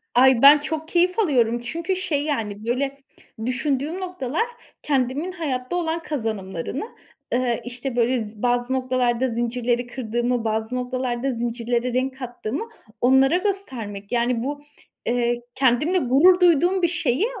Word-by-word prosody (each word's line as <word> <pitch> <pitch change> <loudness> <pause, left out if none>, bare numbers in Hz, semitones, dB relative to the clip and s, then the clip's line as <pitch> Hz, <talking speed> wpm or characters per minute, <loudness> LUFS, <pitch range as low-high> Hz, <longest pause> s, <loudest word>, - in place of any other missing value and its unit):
Ay 255 -1 +6
ben 285 +2 +10
çok 315 +1 -4
keyif 360 +4 +2
alıyorum 240 - +2
çünkü, 335 +9 -2
şey 320 -6 -1
yani, 220 -8 -3
böyle, 270 +4 -1 0.5
düşündüğüm 280 +6 -1
noktalar 360 - -2 0.4
kendimin 280 +5 0
hayatta 285 -4 -3
olan 335 -1 -1
kazanımlarını, 220 - -3 0.5
ııı, 245 -1 +1
işte 245 +1 -5
böyle 240 0 +2
z 210 0 -10
bazı 245 +1 +1
noktalarda 255 -1 +1
zincirleri 240 +1 -1
kırdığımı, 240 0 -1
bazı 220 +2 -1
noktalarda 250 0 -2
zincirlere 240 +1 -2
renk 260 +1 -1
kattığımı 245 - -4 0.4
onlara 265 +5 +5
göstermek. 255 - -4
Yani 240 -1 +1
bu, 285 +2 -4 0.4
eee, 240 0 0
kendimle 270 +7 +2
gurur 335 +6 +5
duyduğum 355 +2 +4
bir 345 - +4
şeyi 320 - 0
255 Hz, 130 wpm, -23 LUFS, 240-300 Hz, 0.5 s, ben